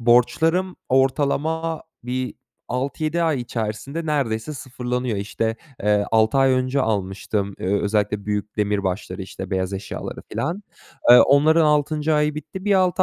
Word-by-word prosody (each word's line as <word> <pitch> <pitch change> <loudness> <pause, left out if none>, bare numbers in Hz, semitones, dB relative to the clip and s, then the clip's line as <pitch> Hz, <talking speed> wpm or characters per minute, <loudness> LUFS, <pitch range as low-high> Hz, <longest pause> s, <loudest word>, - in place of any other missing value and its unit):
borçlarım 140 +10 +3
ortalama 150 +5 +1 0.2
bir 125 +1 -3 0.3
6-7 155 +6 -1
ay 155 -6 +1
içerisinde 120 +7 -4
neredeyse 135 -3 -1
sıfırlanıyor. 125 -3 -3
İşte, 110 +3 -2 0.3
eee, 105 0 +3
6 110 +3 +3
ay 135 0 +5
önce 130 +2 +1
almıştım, 100 -2 -1
eee, - - -4
özellikle 105 -1 0
büyük 105 0 -3
demirbaşları 100 -2 -1
işte 95 0 -8
beyaz 95 0 -1
eşyaları 95 - -6
filan. 175 +8 -3 0.5
Eee, 125 - +11
onların 155 +3 +5
6. 150 +1 +2
ayı 150 0 +2
bitti, 160 +6 -7
bir 205 -1 +3
6 185 0 +3
130 Hz, 135 wpm, -22 LUFS, 105-150 Hz, 0.5 s, Eee